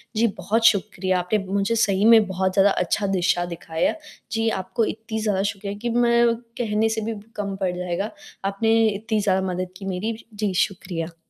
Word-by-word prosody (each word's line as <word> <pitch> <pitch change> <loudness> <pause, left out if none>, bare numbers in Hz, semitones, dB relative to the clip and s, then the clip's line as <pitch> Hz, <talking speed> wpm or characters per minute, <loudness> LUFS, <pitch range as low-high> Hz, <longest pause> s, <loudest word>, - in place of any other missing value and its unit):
जी, 230 +2 +3
बहुत 225 +2 0
शुक्रिया 190 -3 +2
आपने 180 +4 0
मुझे 200 +4 0
सही 205 -2 +2
में 225 -1 +7
बहुत 190 0 -1
ज़्यादा 200 0 +5
अच्छा 195 +4 0
दिशा 180 -2 +1
दिखाया, 165 -1 -1 0.4
जी, 225 +1 0
आपको 195 +3 -1
इतनी 220 0 -4
ज़्यादा 205 -3 +1
शुक्रिया 200 0 -3
कि 240 - -1
मैं 235 -1 +4 0.2
कहने 220 -1 +1
से 220 0 -1
भी 225 +1 -2
ब 205 -1 -10
कम 200 -2 -3
पड़ 185 - +1
जाएगा। 180 +3 -3 0.3
आपने 225 +3 +2
इतनी 215 +1 -1
ज़्यादा 190 -2 +1
मदद 180 0 -3
की 195 - -9
मेरी, 195 +4 -2 0.2
जी, 205 -2 -1
शुक्रिया। 175 -3 -2
200 Hz, 180 wpm, -23 LUFS, 185-220 Hz, 0.4 s, में